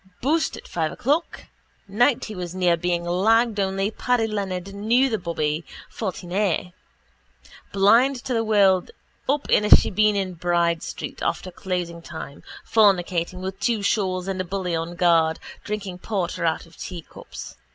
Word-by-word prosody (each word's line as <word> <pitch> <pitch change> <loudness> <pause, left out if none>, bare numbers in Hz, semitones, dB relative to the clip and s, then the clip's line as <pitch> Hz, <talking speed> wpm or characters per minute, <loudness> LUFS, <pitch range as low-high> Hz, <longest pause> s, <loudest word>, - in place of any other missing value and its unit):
Boosed 315 +5 0
at - - -12
five 160 -2 -2
o'clock. 295 +7 -1 0.4
Night 240 +6 +2
he 215 - -7
was 180 -2 -6
near 180 -2 +3
being 175 0 -1
lagged 215 +6 +2
only 195 +1 0
Paddy 245 0 +1
Leonard 195 -3 -3
knew 235 +6 +2
the 220 - 0
bobby, 160 -2 -2 0.3
14A. 185 -3 -2 1.0
Blind 230 +8 +4
to 255 - -1
the 225 -1 +1
world 200 -4 +3 0.4
up 285 +1 +1
in - - +5
a 210 - 0
shebeen 210 +1 +5
in 190 -2 -1
Bride 170 -1 +1
street - - -7
after 185 - -2
closing 175 -2 -4
time, 155 -3 -9 0.3
fornicating 180 -4 +2
with 190 +1 -5
two 225 -3 0
shawls 190 -3 0
and 190 -1 -2
a - - -2
bully 185 -1 -2
on 165 +2 -4
guard, 165 -2 +3 0.2
drinking 200 -4 -5
porter 180 -5 -2
out 160 - -1
of 165 - -19
teacups. 170 -3 -9
190 Hz, 150 wpm, -23 LUFS, 175-215 Hz, 1.0 s, in